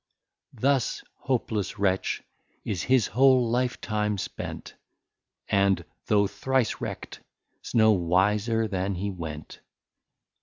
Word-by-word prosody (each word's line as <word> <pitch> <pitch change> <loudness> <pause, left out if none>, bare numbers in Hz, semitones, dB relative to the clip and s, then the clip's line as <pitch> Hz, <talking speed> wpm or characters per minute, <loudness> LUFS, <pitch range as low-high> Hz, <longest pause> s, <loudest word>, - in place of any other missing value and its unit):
Thus, 135 -2 +1
hopless 110 -6 -2
Wretch, 95 -2 0 0.4
is 95 -5 -2
his 130 -3 +3
whole 130 0 +4
Life 125 0 0
time 105 -1 -1
spent, - - -6 0.7
And 100 -3 +2 0.2
though 100 -1 +4
thrice 125 +4 -1
Wreck't, - - -6 0.4
's - - -8
no 110 -1 +6
Wiser 105 +5 +2
than 95 -1 -2
he 100 +3 -2
went. 80 -5 -7
105 Hz, 110 wpm, -26 LUFS, 95-120 Hz, 0.7 s, no